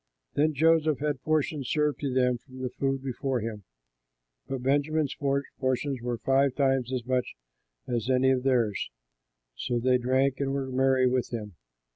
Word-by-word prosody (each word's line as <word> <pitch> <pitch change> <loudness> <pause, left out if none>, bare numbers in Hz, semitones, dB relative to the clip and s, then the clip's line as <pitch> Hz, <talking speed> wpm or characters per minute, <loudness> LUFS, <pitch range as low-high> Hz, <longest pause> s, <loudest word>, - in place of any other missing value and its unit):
Then 155 +1 +2
Joseph 160 0 +3
had 145 -2 -2
portions 150 -3 0
served 150 -1 +1
to 140 -2 -2
them 125 -1 +2
from 130 +1 -11
the 125 - -2
food 135 -1 -1
before 135 0 -2
him. 105 -3 -5 0.8
But 135 -2 -4
Benjamin's 145 +2 +1
portions 135 -1 -1
were 120 0 -2
five 135 +2 +2
times 135 -3 +1
as 125 -2 -2
much 125 -1 -1 0.5
as 120 -1 -2
any 130 0 +4
of 130 -1 +1
theirs. 120 -6 +1 0.7
So 120 - -2
they 125 +1 +3
drank 130 +2 +1
and 135 -1 -1
were 135 -1 -3
merry 130 0 +3
with 125 0 +1
him. 105 -4 -5
130 Hz, 160 wpm, -28 LUFS, 125-140 Hz, 0.8 s, any